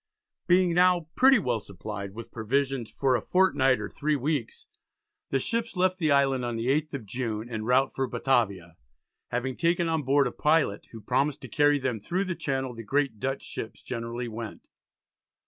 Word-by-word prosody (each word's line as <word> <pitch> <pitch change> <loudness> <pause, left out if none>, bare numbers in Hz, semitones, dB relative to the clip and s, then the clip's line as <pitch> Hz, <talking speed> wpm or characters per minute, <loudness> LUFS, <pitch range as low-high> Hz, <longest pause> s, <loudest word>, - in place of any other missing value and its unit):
Being 180 -1 +4
now 175 -2 +3
"pretty 270 0 +6
well 125 - 0
supplied" 100 0 -7
with 115 0 -8
provisions 130 +1 -1
"for 130 +3 +1
a 120 - 0
fortnight 135 - +3
or 105 - -4
three 150 +7 -1
weeks," 140 -3 -2 0.6
the 135 - +1
ships 230 - -2
left 185 +1 +2
the 155 -4 +2
island 135 -2 +3
on 120 -1 -2
the 115 +2 -2
8th 150 +1 0
of 125 -6 -6
June 110 0 -3
en 110 -2 -4
route 130 +3 +3
for 135 -1 -1
Batavia, 100 -9 0 0.5
having 125 +2 -2
taken 170 +2 +1
on 160 -1 0
board 140 +1 +3
a 125 - -1
pilot 150 -9 +1
who 115 - -9
promised 135 +6 0
to - - -8
carry 145 0 +3
them 130 -5 -2
"through 175 - -1
the 185 - -2
Channel 135 -6 -2
the 115 - -8
great 135 -1 0
Dutch 135 +4 -2
ships 110 - -7
generally 120 0 -4
went." 115 -1 -7
130 Hz, 180 wpm, -27 LUFS, 115-150 Hz, 0.6 s, pretty